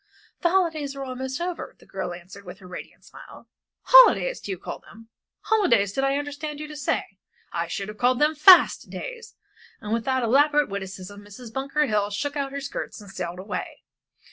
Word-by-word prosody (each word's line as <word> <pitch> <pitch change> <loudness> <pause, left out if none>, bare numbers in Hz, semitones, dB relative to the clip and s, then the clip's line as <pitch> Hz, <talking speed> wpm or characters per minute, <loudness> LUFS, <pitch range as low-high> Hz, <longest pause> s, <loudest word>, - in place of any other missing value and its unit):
"The 345 - +3
holidays 320 -6 0
are 275 - -5
almost 260 +1 -5
over," 350 0 -5
the - - -20
girl - - -5
answered, 180 +3 -11
with 180 0 -10
her 190 - -16
radiant 180 - -10
smile. - - -14 0.4
"Holidays - - +6
do - - -9
you 190 - -2
call - - -7
them? 225 +1 -16 0.3
Holidays 235 - +2
did 270 - -1
I 275 +1 +2
understand 290 +1 -5
you 305 - -6
to 300 - -8
say? 270 -8 -3 0.3
I 170 0 -2
should 195 +4 -4
have 210 0 -9
called 250 +1 +3
them 300 +3 +3
fast 350 +5 +6
days." 480 -2 -8 0.4
And, 210 0 -4
with 230 -1 -1
that 260 -1 +1
elaborate 290 +5 +3
witticism, 195 0 -7
Mrs. 215 +3 -12
Bunker 275 +3 0
Hill 210 -5 0
shook 285 +8 -3
out 280 -1 -2
her 280 0 -5
skirts 280 -3 -6
and 205 -2 -12
sailed 175 -2 -5
away. 195 +3 -6
260 Hz, 195 wpm, -25 LUFS, 200-295 Hz, 0.4 s, Holidays